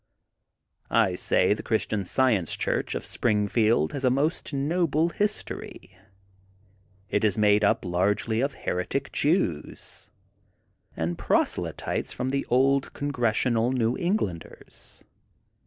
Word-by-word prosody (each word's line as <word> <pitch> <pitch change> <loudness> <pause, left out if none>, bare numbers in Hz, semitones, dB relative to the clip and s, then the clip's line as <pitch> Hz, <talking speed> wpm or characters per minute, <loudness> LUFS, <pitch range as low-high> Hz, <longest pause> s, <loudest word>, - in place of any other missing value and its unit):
I 110 -5 +3
say 90 +2 +2
the 105 - -6
Christian 110 -2 -1
Science 110 -3 +1
Church - - -1
of - - -4
Springfield 105 -4 +1
has 140 - -4
a 130 - +4
most 145 +7 -1
noble 160 +3 +1
history. 205 - -4 1.2
It 105 - +1
is 105 -2 +2
made 105 0 +4
up 100 - +2
largely 100 +6 0
of 140 0 -1
heretic 90 +10 -3
Jews 145 - -2 0.9
and 85 +1 -2
prose - - +1
lytes - - -3
from 130 - -2
the 135 +1 -2
old 135 +2 +2
Congregational 120 -3 0
New 120 -1 +1
Eng 180 +5 +1
landers. 85 - -8
115 Hz, 120 wpm, -26 LUFS, 105-140 Hz, 1.2 s, a